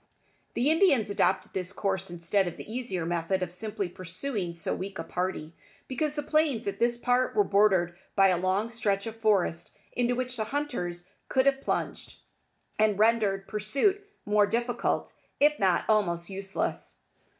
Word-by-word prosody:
The 265 Hz, +6 st, +3 dB
Indians 280 Hz, -, +3 dB
adopted 190 Hz, -1 st, +1 dB
this 185 Hz, -1 st, -2 dB
course 195 Hz, -2 st, -2 dB
instead 175 Hz, +3 st, 0 dB
of 175 Hz, -, -5 dB
the -, -, -9 dB
easier 220 Hz, -7 st, -3 dB
method 175 Hz, +2 st, 0 dB
of 175 Hz, -, -4 dB
simply 210 Hz, +1 st, -2 dB
pursuing 185 Hz, +2 st, -4 dB
so 170 Hz, -, -2 dB
weak 195 Hz, +1 st, -5 dB
a 165 Hz, -, -3 dB
party, 180 Hz, -3 st, -3 dB, 0.3 s
because 295 Hz, +3 st, -2 dB
the 295 Hz, -, -2 dB
plains 290 Hz, -7 st, +1 dB
at 200 Hz, 0 st, -3 dB
this 235 Hz, 0 st, +2 dB
part 250 Hz, +1 st, +1 dB
were 205 Hz, -, +5 dB
bordered 195 Hz, -4 st, +3 dB, 0.2 s
by 195 Hz, -1 st, +6 dB
a 180 Hz, -, +2 dB
long 190 Hz, +5 st, 0 dB
stretch 200 Hz, -4 st, 0 dB
of 225 Hz, 0 st, -6 dB
forest 195 Hz, -6 st, +1 dB
into 245 Hz, 0 st, +1 dB
which 255 Hz, 0 st, -3 dB
the 220 Hz, -, -1 dB
hunters 210 Hz, -10 st, -3 dB, 0.2 s
could 260 Hz, 0 st, +3 dB
have 275 Hz, 0 st, +3 dB
plunged, -, -, -3 dB, 0.6 s
and 215 Hz, -2 st, +3 dB
rendered 210 Hz, -3 st, +2 dB
pursuit 275 Hz, -, +1 dB, 0.2 s
more 205 Hz, 0 st, +4 dB
difficult, 240 Hz, +2 st, -1 dB, 0.3 s
if 295 Hz, +1 st, +4 dB
not 185 Hz, -3 st, +2 dB
almost 180 Hz, -5 st, +1 dB
useless. 195 Hz, 0 st, -3 dB
205 Hz, 160 wpm, -28 LUFS, 185-240 Hz, 0.6 s, by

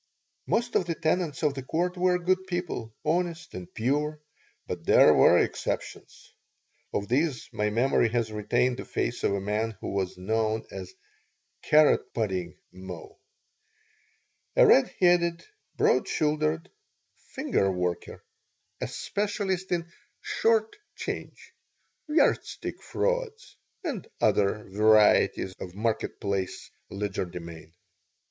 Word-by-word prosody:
Most 235 Hz, +1 st, 0 dB
of 180 Hz, -, +2 dB
the 165 Hz, -, -1 dB
tenants 160 Hz, -2 st, -1 dB
of 150 Hz, -2 st, +3 dB
the 135 Hz, -, -5 dB
Court 175 Hz, +7 st, -1 dB
were 180 Hz, 0 st, +2 dB
good 185 Hz, +1 st, 0 dB
people, 175 Hz, -11 st, -3 dB
honest 165 Hz, 0 st, -1 dB
and 90 Hz, -1 st, -8 dB
pure, 150 Hz, +6 st, -1 dB, 0.5 s
but -, -, -5 dB
there -, -, +7 dB
were -, -, +6 dB
exceptions. -, -, -3 dB, 0.6 s
Of 100 Hz, -, -2 dB
these 135 Hz, +2 st, 0 dB
my 105 Hz, 0 st, 0 dB
memory 120 Hz, +1 st, +2 dB
has 115 Hz, -1 st, -1 dB
retained 120 Hz, +4 st, +1 dB
the -, -, -5 dB
face -, -, -2 dB
of -, -, +2 dB
a -, -, -1 dB
man 105 Hz, +2 st, -2 dB
who -, -, -5 dB
was 95 Hz, -2 st, -2 dB
known 110 Hz, +3 st, -1 dB
as 385 Hz, -, -8 dB, 0.7 s
"Carrot 155 Hz, -1 st, +4 dB
Pudding" 95 Hz, -6 st, -2 dB
Moe, 95 Hz, -3 st, -10 dB, 1.4 s
a -, -, +7 dB
red 135 Hz, -, +5 dB
headed, 175 Hz, -1 st, +3 dB, 0.3 s
broad -, -, +3 dB
shouldered 155 Hz, +2 st, 0 dB, 0.6 s
"finger 260 Hz, -, +1 dB
worker," 90 Hz, -1 st, -3 dB, 0.6 s
a -, -, -1 dB
specialist 200 Hz, -3 st, -2 dB
in 170 Hz, -1 st, -1 dB, 0.3 s
"short 225 Hz, -1 st, +1 dB, 0.2 s
change," -, -, -6 dB, 0.6 s
yardstick 300 Hz, -, +1 dB
frauds, -, -, -2 dB, 0.3 s
and 275 Hz, -, -4 dB
other 105 Hz, 0 st, +2 dB
varieties 105 Hz, -2 st, +4 dB
of 90 Hz, -1 st, -8 dB
market 110 Hz, +1 st, -2 dB
place 100 Hz, -3 st, -3 dB, 0.2 s
legerdemain. 90 Hz, -5 st, -5 dB
135 Hz, 120 wpm, -27 LUFS, -, 1.4 s, there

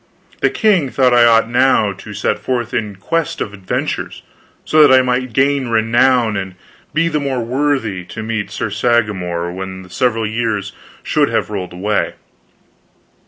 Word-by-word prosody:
The -, -, +2 dB
king 190 Hz, -, +2 dB
thought 130 Hz, -1 st, +2 dB
I 120 Hz, -1 st, +6 dB
ought 115 Hz, -1 st, +4 dB
now 120 Hz, -4 st, +2 dB
to 100 Hz, +2 st, -11 dB
set 105 Hz, -, -1 dB
forth 120 Hz, +1 st, -3 dB
in 105 Hz, -3 st, -2 dB
quest 165 Hz, -, -2 dB
of 105 Hz, -, -4 dB
adventures, 95 Hz, -2 st, -4 dB, 0.4 s
so 155 Hz, -, +4 dB
that 145 Hz, -3 st, +7 dB
I 130 Hz, 0 st, +6 dB
might 125 Hz, 0 st, -1 dB
gain 135 Hz, +2 st, +1 dB
renown 115 Hz, 0 st, +2 dB
and 95 Hz, -1 st, -4 dB, 0.4 s
be 165 Hz, +2 st, +1 dB
the 155 Hz, -2 st, 0 dB
more 135 Hz, -4 st, -2 dB
worthy 125 Hz, -7 st, -1 dB
to 110 Hz, -, -7 dB
meet 110 Hz, -2 st, -3 dB
Sir 105 Hz, +1 st, -4 dB
Sagramor 100 Hz, -6 st, 0 dB
when 95 Hz, 0 st, -6 dB
the 90 Hz, -, -16 dB
several 115 Hz, -1 st, 0 dB
years 110 Hz, -3 st, -2 dB, 0.3 s
should -, -, +1 dB
have -, -, -1 dB
rolled 95 Hz, -4 st, -5 dB
away. 100 Hz, +4 st, -1 dB
115 Hz, 165 wpm, -17 LUFS, 100-130 Hz, 0.4 s, that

